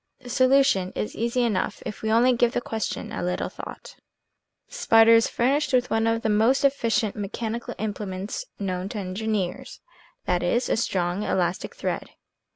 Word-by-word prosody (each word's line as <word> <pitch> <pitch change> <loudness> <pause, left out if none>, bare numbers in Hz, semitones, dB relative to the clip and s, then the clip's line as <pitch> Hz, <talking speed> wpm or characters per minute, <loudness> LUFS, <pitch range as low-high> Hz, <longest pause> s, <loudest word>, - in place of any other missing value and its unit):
The 250 -2 -12
solution 255 -8 +3
is 210 - -3
easy 235 +2 0
enough 210 -6 -1
if - - -6
we 220 - -1
only 240 +3 +5
give 240 0 +2
the - - +1
question 225 -3 -4
a - - -4
little 180 +1 -2
thought. - - -10 0.7
The - - -20
spider 225 - +5
is 230 0 +5
furnished 275 +4 0
with 250 -1 +2
one 225 0 +2
of 225 +1 0
the - - +1
most 225 +7 +3
efficient 230 -6 +1
mechanical 220 +3 -4
implements 205 - -4
known 185 -1 -3
to 215 - -6
engineers, 205 +4 -3 0.5
viz., 180 +8 0
a - - +2
strong 180 -4 -1
elastic 180 -3 -1
thread. - - -3
225 Hz, 160 wpm, -25 LUFS, 195-245 Hz, 0.7 s, only